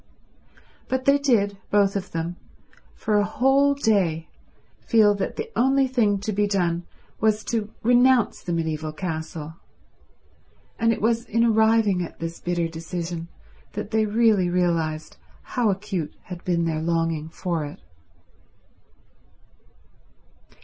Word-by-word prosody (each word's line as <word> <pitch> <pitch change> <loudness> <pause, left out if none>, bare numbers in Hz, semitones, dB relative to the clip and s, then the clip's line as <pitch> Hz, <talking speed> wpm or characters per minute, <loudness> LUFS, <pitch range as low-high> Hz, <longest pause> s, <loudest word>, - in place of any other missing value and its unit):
But 260 0 -2
they 280 +1 +5
did, 205 -8 +1
both 200 -1 +3
of 200 0 -3
them, 165 +1 -3 0.6
for 210 -1 +1
a - - +3
whole 270 +6 +3
day 190 - +1 0.5
feel 215 -3 +4
that 200 -1 -3
the 445 +1 -5
only 270 +2 +3
thing 235 -6 +2
to 215 +1 -2
be 205 +1 +1
done 175 -4 0 0.3
was 215 0 +2
to 220 -2 -2
renounce 245 0 +4
the 175 - -5
mediaeval 160 -2 -2
castle; 160 -2 -5 1.2
and 230 0 +3
it 220 - -3
was 230 +1 +1
in 230 +2 +1
arriving 220 -4 +3
at 175 - -6
this 165 0 -5
bitter 175 -1 -1
decision 165 +1 -5 0.5
that - - -5
they 220 -1 +2
really 210 -4 +3
realized 165 -3 -1 0.4
how 240 -4 +2
acute 195 -5 -3
had 180 -1 -9
been 170 -2 0
their 160 -1 -1
longing 165 -1 -1
for 170 -1 -3
it. 145 0 -8
200 Hz, 130 wpm, -24 LUFS, 165-225 Hz, 1.2 s, they